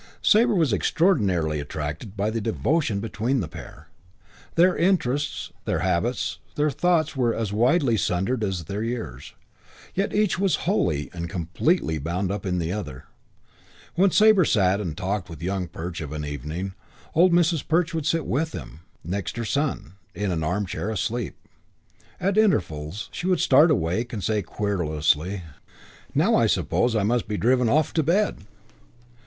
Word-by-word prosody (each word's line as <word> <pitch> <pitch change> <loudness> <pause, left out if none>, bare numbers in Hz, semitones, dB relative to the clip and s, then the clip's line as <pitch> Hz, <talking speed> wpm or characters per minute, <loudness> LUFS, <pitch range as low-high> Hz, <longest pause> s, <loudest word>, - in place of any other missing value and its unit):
Sabre 230 +1 +5
was 160 - +2
extraordinarily 95 - +2
attracted 75 +7 -5
by 105 +2 0
the 115 0 -2
devotion 115 0 0
between 115 +4 -1
the 90 - -2
pair. - - -11 0.7
Their 180 +2 +5
interests, 145 -6 0
their - - 0
habits, 115 +9 -1 0.2
their 150 0 +1
thoughts 160 0 +1
were 120 -3 +1
as 110 -3 -2
widely 120 +2 +3
sundered 100 +7 0
as 95 -4 -2
their 100 +6 -4
years, 110 - -5 0.6
yet 195 +2 -1
each 210 -3 +1
was 190 -5 +2
wholly 85 - 0
and 85 -1 -5
completely 85 - 0
bound 90 +6 -2
up 100 -1 -4
in 90 -1 0
the 85 -1 -2
other. 95 -11 -6 0.9
When 195 +3 +4
Sabre 215 0 +5
sat 100 - +2
and 85 -6 -4
talked 95 0 -2
with 80 -3 -9
Young 95 0 -2
Perch 85 +1 -6
of 75 -1 -6
an 75 -1 -4
evening, 75 +7 -5 0.4
old 175 +3 +5
Mrs. 170 -3 +2
Perch 170 +1 +1
would 160 -2 -2
sit 165 -1 +1
with 160 +6 -1
them, 75 - -8 0.2
next 95 +5 -4
her 120 - -2
son, 130 - -2 0.2
in 100 0 -1
an 80 -2 -1
armchair 95 +4 -2
asleep. 110 +1 -2 0.8
At 195 +3 +1
intervals 90 - 0
she 175 - -4
would 180 -3 +2
start 145 +5 +6
awake 115 - 0
and 105 -4 -4
say 110 -1 +1
querulously, 90 -2 -1 0.7
"Now - - +3
I - - +4
suppose 120 -1 +1
I 105 - +2
must 120 +3 +1
be 105 0 -2
driven 125 +1 +3
off 150 +4 +2
to 160 - +2
bed." 170 - 0
110 Hz, 160 wpm, -24 LUFS, -, 0.9 s, start